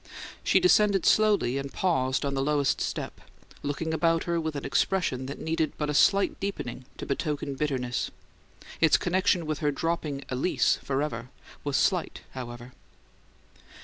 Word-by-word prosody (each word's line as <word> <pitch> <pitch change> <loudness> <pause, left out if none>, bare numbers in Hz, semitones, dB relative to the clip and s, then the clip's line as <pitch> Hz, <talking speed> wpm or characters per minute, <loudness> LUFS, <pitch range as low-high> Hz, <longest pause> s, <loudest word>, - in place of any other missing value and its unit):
She - - +4
descended 210 - +4
slowly, 205 - +3
and 140 0 -5
paused 130 -7 0
on 140 - -1
the 135 - 0
lowest 145 -1 +1
step, - - -4 0.4
looking 160 +3 -2
about 165 0 +2
her 170 -1 0
with 160 -1 -3
an 140 - -4
expression 135 -1 0
that 140 - -6
needed 160 -1 -1
but 150 -1 -1
a - - -2
slight 195 +7 +3
deepening 130 -11 -4
to - - -6
betoken 140 0 -2
bitterness. 130 -4 -1 0.7
Its 160 -2 +5
connection 185 -1 +1
with 155 -1 -2
her 150 - +1
dropping 150 -2 -2
"Alys" 130 +8 +2
forever 135 -4 -2 0.3
was 145 -2 0
slight, 180 +2 +1
however. 120 -1 -8
150 Hz, 145 wpm, -27 LUFS, 135-170 Hz, 0.7 s, Its